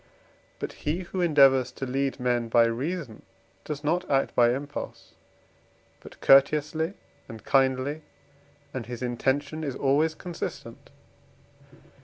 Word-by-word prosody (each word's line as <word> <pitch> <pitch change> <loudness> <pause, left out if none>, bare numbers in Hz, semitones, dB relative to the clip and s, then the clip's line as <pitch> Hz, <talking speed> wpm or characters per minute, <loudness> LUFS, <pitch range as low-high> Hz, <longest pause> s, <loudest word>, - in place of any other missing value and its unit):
But - - -5 0.2
he, 170 +5 0
who 185 +1 -4
endeavours 135 -6 +5
to 135 - -5
lead 135 +1 -2
men 120 -2 0
by 115 0 +5
reason, 130 +1 -3 0.4
does 150 -1 -6
not 165 +4 0
act 135 -1 +1
by 120 -1 +4
impulse 145 +2 -7 0.9
but - - -14
courteously 150 +5 +4 0.3
and 110 -2 -10
kindly, 135 +3 +1 0.7
and 120 -4 -5
his 125 0 -6
intention 140 +5 -1
is 140 -4 -3
always 150 +4 +1
consistent. 175 0 -7
140 Hz, 120 wpm, -26 LUFS, 125-155 Hz, 0.9 s, endeavours